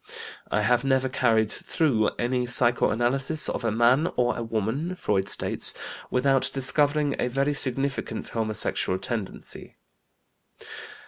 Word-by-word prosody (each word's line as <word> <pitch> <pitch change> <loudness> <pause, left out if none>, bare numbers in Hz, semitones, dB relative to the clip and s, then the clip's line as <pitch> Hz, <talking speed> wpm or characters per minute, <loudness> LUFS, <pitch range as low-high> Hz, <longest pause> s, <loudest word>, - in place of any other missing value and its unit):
"I 105 - 0
have 125 +4 +2
never 130 -1 +1
carried 110 -4 +1
through 130 -11 0
any 125 +1 -1
psychoanalysis 125 +4 +2
of - - -3
a 115 - +1
man 120 +8 +3
or 125 0 +1
a - - -4
woman," 115 - -2
Freud 100 - -1
states, - - +2 0.3
"without 130 0 +2
discovering 145 +2 +2
a - - +1
very 135 +4 0
significant 135 -3 -1
homosexual 110 -4 -1
tendency." 110 0 -6
125 Hz, 120 wpm, -25 LUFS, 115-135 Hz, 0.3 s, man